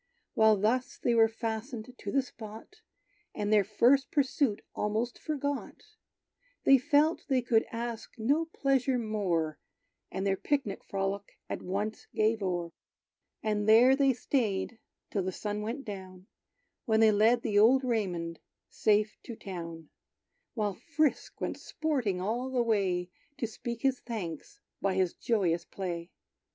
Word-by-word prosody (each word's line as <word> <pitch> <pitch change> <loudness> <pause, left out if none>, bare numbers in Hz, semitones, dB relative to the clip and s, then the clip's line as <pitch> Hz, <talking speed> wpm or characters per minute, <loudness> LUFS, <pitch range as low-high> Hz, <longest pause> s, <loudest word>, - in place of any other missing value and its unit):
While 220 -1 +5
thus 235 +6 0
they 240 - +1
were 225 -1 +6
fastened 225 +2 -5
to - - -6
the 275 -1 +2
spot, 225 - -11 0.6
And 210 +1 0
their 210 -1 +6
first 245 +7 +3
pursuit 270 -5 +1
almost 220 +4 -1
forgot, 285 -2 -3 0.8
They 270 -1 +7
felt 300 +4 +2
they 260 -4 +2
could 225 -2 +2
ask 230 -1 -5
no 280 +9 +2
pleasure 270 -4 +1
more, 190 -9 -1 0.5
And 190 - -3
their 195 -1 +2
picnic 270 -8 -1
frolic 195 +1 -3
at - - -4
once 205 +4 -3
gave 220 0 +2
o'er. 175 -3 -2 0.7
And 210 -1 0
there 245 +4 +7
they 275 -1 +4
staid 225 -3 -1 0.3
till 200 - 0
the 185 0 -2
sun 210 +2 -3
went 235 +6 -4
down, 190 -3 -8 0.6
When 220 -1 +3
they 220 -1 +7
led 225 +3 +4
the 205 -1 +3
old 255 +5 +6
Raymond 180 -9 -1 0.3
safe 210 0 +2
to 235 - -6
town; 165 -5 -7 0.7
While 210 -3 0
Frisk 300 +8 -1
went - - -3
sporting 260 -12 -1
all 235 +7 -1
the 255 -2 +1
way, 185 -5 0 0.3
To 255 - -1
speak 230 +1 -6
his 265 -2 +2
thanks 230 - -6 0.2
by 195 -1 +1
his 185 -2 +1
joyous 180 -7 +1
play. 175 -3 -5
220 Hz, 140 wpm, -30 LUFS, 195-250 Hz, 0.8 s, They